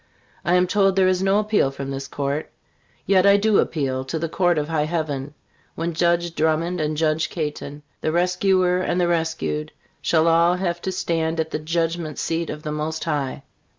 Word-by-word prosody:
I 175 - +2
am 180 0 +4
told 195 0 +2
there 190 -1 +4
is 185 0 +2
no 195 +1 +3
appeal 210 -8 +2
from 135 0 -6
this 135 0 -5
Court; 140 +2 -3 0.6
yet 190 0 +4
I 200 0 +7
do 210 0 +3
appeal 130 -4 -1
to 160 - -3
the 165 +1 -2
Court 175 0 +1
of 150 -1 -1
High 155 -2 0
Heaven, 150 -3 -3 0.4
when 165 +1 -2
Judge 170 +1 +1
Drummond 160 +2 0
and 150 0 -1
Judge 155 0 +1
Caton, 150 -2 -5 0.2
the 155 - 0
rescuer 180 +1 +2
and 180 -1 0
the 175 - +2
rescued, 160 -2 -1 0.3
shall 160 0 +2
all 170 +2 +4
have 175 -2 -2
to 190 - -2
stand 165 -3 -1
at 160 0 -1
the 155 - -2
judgment 165 0 -2
seat 165 0 -2
of 150 - -6
the 150 - -3
Most 155 +1 -3
High. 145 -4 -2
165 Hz, 190 wpm, -22 LUFS, 155-180 Hz, 0.6 s, I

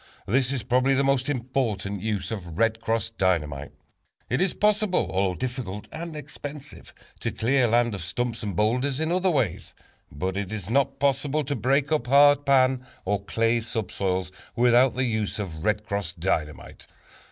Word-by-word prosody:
This 130 +4 +2
is 130 -4 -2
probably 130 +2 +2
the 135 - +2
most 135 -1 +1
important 115 -7 -2
use 105 -2 -2
of 90 -7 -6
"Red 115 0 +1
Cross" 115 -1 -1
Dynamite. 75 -7 0 0.6
It - - +1
is 190 -2 +1
possible, 210 -2 +2
although 95 -1 +1
difficult 120 -4 -5
and 165 0 -6
expensive, 145 0 -8 0.3
to - - -2
clear 125 +2 +2
land 120 0 +2
of 100 - -4
stumps 115 +7 -3
and 100 -4 -4
boulders 125 - +1
in 160 +1 0
other 185 +1 +2
ways, 130 - -1 0.4
but 95 +7 -3
it 100 -1 -3
is 105 -2 -5
not 135 +1 +2
possible 140 +2 +1
to 145 +1 -2
break 135 +5 +1
up 150 -6 +1
hard 145 +1 +5
pan, 130 -2 +4 0.2
or 100 +1 -1
clay 115 +3 +1
subsoils, 95 -5 -2 0.2
without 125 +1 +4
the 130 0 +1
use 110 -3 -1
of 85 -7 -5
"Red 105 0 0
Cross" 100 -5 -3
Dynamite. 80 -4 -3
120 Hz, 165 wpm, -25 LUFS, 100-135 Hz, 0.6 s, hard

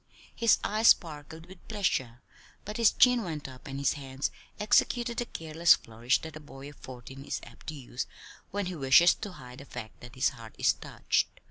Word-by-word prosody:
His 230 -2 +4
eyes 220 +2 +2
sparkled 160 0 +2
with 185 0 -16
pleasure 130 - -1 0.4
but 210 +1 -5
his 230 -2 +5
chin 250 -2 +5
went 160 -8 -5
up, 130 +1 -12
and 135 0 -5
his 140 -1 +2
hands 135 -1 -4 0.3
executed 235 +3 +2
the 240 - 0
careless 165 +1 +3
flourish 115 +3 0
that 160 -2 -7
a - - -7
boy 140 -2 -11
of 145 - -19
fourteen 130 +1 -10
is - - -3
apt - - -15
to 155 - -4
use 125 -3 -5 0.4
when 205 0 -2
he 180 - -3
wishes 150 +3 +6
to 205 -4 -7
hide 125 -6 -11
the 140 - -10
fact 120 -5 -9
that 120 +1 -11
his 130 - +3
heart 115 -1 -12
is - - +4
touched. - - -1
150 Hz, 200 wpm, -29 LUFS, 130-190 Hz, 0.4 s, wishes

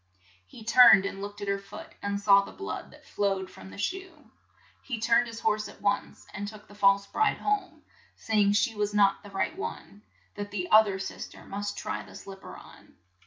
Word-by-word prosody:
He 225 - -13
turned 230 -3 +7
and 195 0 -5
looked 205 +1 -7
at 205 - -4
her 200 0 0
foot, 195 - -11
and 200 0 -2
saw 200 -1 +6
the - - -10
blood 400 - -6
that - - -18
flowed 195 -2 -1
from 95 0 -12
the 95 - -12
shoe. 370 -5 -5 0.5
He 250 -4 -5
turned 235 +2 +3
his 230 0 -8
horse 215 -1 0
at - - -15
once, 200 0 -2
and 205 +1 -5
took 210 0 -11
the - - -15
false 200 -1 +3
bride 430 - +1
home, 370 -7 -2 0.3
say 220 -2 0
ing 200 0 +4
she 225 +2 +2
was 210 -1 -2
not 200 -1 +4
the 205 - -12
right 195 +10 -2
one, 210 - -7 0.3
that 205 0 -6
the 185 -3 -3
oth 215 0 +8
er 195 -1 -2
sis 190 0 -6
ter - - -15
must 205 +1 -5
try - - -4
the - - -14
slip 195 -1 -10
per - - -10
on. - - -16
205 Hz, 215 wpm, -28 LUFS, 200-225 Hz, 0.5 s, oth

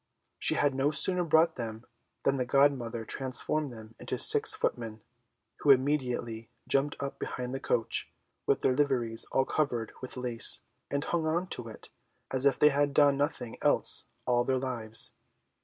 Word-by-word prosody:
She - - +4
had 145 -2 +1
no 135 +2 0
sooner 180 +4 +2
brought 160 0 +2
them 115 -1 -6 0.4
than 135 0 +1
the 130 - -1
godmother 125 -5 0
transformed 135 +5 -1
them 110 -2 -12
into - - -4
six - - +7
footmen, 110 -2 -4 0.5
who - - -2
immediately 125 -5 0 0.2
jumped 140 +1 0
up 140 -1 -6
behind 125 0 -5
the 135 - -4
coach, 120 -4 -1 0.4
with - - +1
their 130 - +1
liveries 125 -5 +1
all 135 - +1
covered 120 -8 -2
with 130 0 -6
lace, 125 -2 +3 0.3
and 140 0 -2
hung 165 -1 -2
on 170 +3 -1
to 115 - -4
it 110 - -11 0.4
as 130 +1 +1
if 140 - +1
they 150 - +5
had 145 -1 -1
done 145 -1 +4
nothing 140 -5 -4
else - - +2 0.2
all 120 0 +1
their 130 +1 -1
lives. 120 -4 +1
130 Hz, 165 wpm, -28 LUFS, 120-145 Hz, 0.5 s, six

